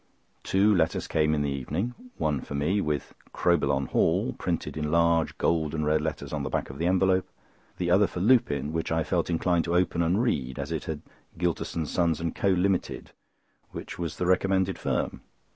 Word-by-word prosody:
Two 100 +3 +3
letters 80 -3 +1
came 75 -1 +2
in 75 - 0
the 70 - -1
evening—one 80 - -3
for 70 - -7
me, 90 +9 +1
with 75 -5 -2 0.2
"Crowbillon 70 -6 +1
Hall" - - +2
printed - - -3
in 75 -1 -2
large 85 0 +2
gold 80 -2 +1
and 75 -1 -1
red 75 0 +2
letters 75 -2 -4
on 75 - -1
the 70 - -3
back - - -2
of 70 - -11
the 85 - +1
envelope; 95 0 +2 0.5
the 85 -1 -1
other 100 +2 +5
for 90 - -6
Lupin, 80 - +2
which 80 0 -2
I 80 0 +1
felt 85 +1 -1
inclined 85 0 +1
to 85 0 -1
open 90 -1 +2
and 85 +5 +2
read, 65 - -1
as - - -4
it - - -3
had - - -5 0.3
"Gylterson, 85 -1 -1
Sons, 85 +1 0
and 85 0 -2
Co. - - -1
Limited," 95 0 0 0.6
which - - -7
was 85 -3 -4
the 90 - -1
recommended 95 +1 +2
firm. - - -2
85 Hz, 190 wpm, -27 LUFS, 75-90 Hz, 0.6 s, other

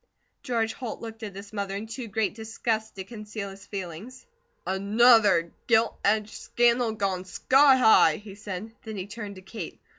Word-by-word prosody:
George 225 -3 -1
Holt 245 -4 -6
looked 225 0 -9
at 205 -3 -7
his 200 +1 -10
mother 200 -2 -3
in 205 +2 -4
too 230 +2 -6
great 215 -1 -1
disgust 220 0 -3
to 190 - -6
conceal 210 -1 -7
his 195 +1 -14
feelings. 195 +6 -7 0.4
"ANOTHER 205 -3 +4 0.2
gilt 225 -1 +3
edged 215 +1 +1
scandal 240 -1 +2
gone 195 -4 -2
sky 270 +8 +4
high," 220 -10 +6
he 205 +1 -10
said. 205 +1 -7
Then 220 -2 -7
he 185 - -4
turned 205 -1 -7
to 185 - -12
Kate. 190 -2 -8
215 Hz, 170 wpm, -26 LUFS, 195-225 Hz, 0.4 s, high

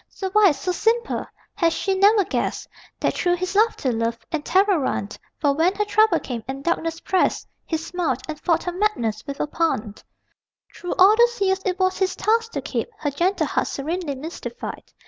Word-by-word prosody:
So 380 -1 -5
wise, 400 -9 +5
so 365 - -1
simple 455 +5 0 0.3
has 335 -2 +2
she 390 - -1
never 400 +2 +5
guessed - - -2 0.3
That - - +1
through 355 0 +1
his 370 +2 -4
laughter, 425 - +2
love 230 0 -1
and 315 -2 -2
terror 380 +1 +3
run? 210 -7 -2 0.3
For 285 -2 +2
when 335 +6 +2
her 420 - 0
trouble 425 -4 +3
came, 240 -5 -5
and 270 +1 -5
darkness 330 0 -1
pressed, 375 - 0 0.2
He 320 - 0
smiled, 325 -5 -2
and 310 -2 -6
fought 330 0 +1
her 355 - -2
madness 245 - -1
with 280 0 -5
a - - +1
pun. 295 -9 -1 0.8
Through 355 - -4
all 390 +3 +7
those 475 0 +3
years 385 -1 +1
it 365 0 0
was 370 0 +1
his 375 -1 +1
task 455 +1 +1
to - - -2
keep - - -3
Her 290 - -2
gentle 350 +8 +1
heart - - -1
serenely 310 +1 -3
mystified. 325 - -7
355 Hz, 190 wpm, -23 LUFS, 295-395 Hz, 0.8 s, all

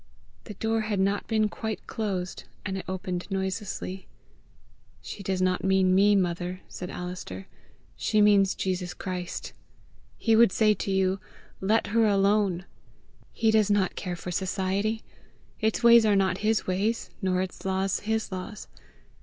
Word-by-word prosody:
The 210 - -8
door 225 +2 0
had 210 -2 -1
not 200 +1 +1
been 215 -1 +2
quite 220 +1 -5
closed, 190 -5 -3 0.2
and 190 -1 -2
it 190 - -5
opened 185 -1 -4
noiselessly. 190 -1 -3 0.9
"She - - -8
does 190 -1 -1
not 185 0 +1
mean 190 -1 +3
me, 205 +2 +5
mother," 180 0 -1
said 180 - -7
Alister; 180 - -6 0.5
"she 215 - +1
means 200 -2 +5
Jesus 180 -1 -2
Christ. 180 -2 -5 0.6
He 225 -1 +3
would 230 -3 +6
say 215 +1 +4
to 200 - -4
you, 190 0 +1 0.4
LET 215 +4 +2
HER 230 -1 +4
ALONE. 200 -2 +2 0.7
He 225 -1 +2
does 215 -2 +3
not 205 -3 +2
care 180 -1 -4
for 180 +1 -6
Society. 190 +4 -1 0.6
Its 220 +1 0
ways 235 -1 +8
are 210 -2 +4
not 190 -1 +2
his 215 +1 +1
ways, 205 +5 -1
nor 185 -2 +1
its 190 - -8
laws 190 0 0
his 220 0 -2
laws. 190 +4 -6
195 Hz, 150 wpm, -27 LUFS, 185-215 Hz, 0.9 s, ways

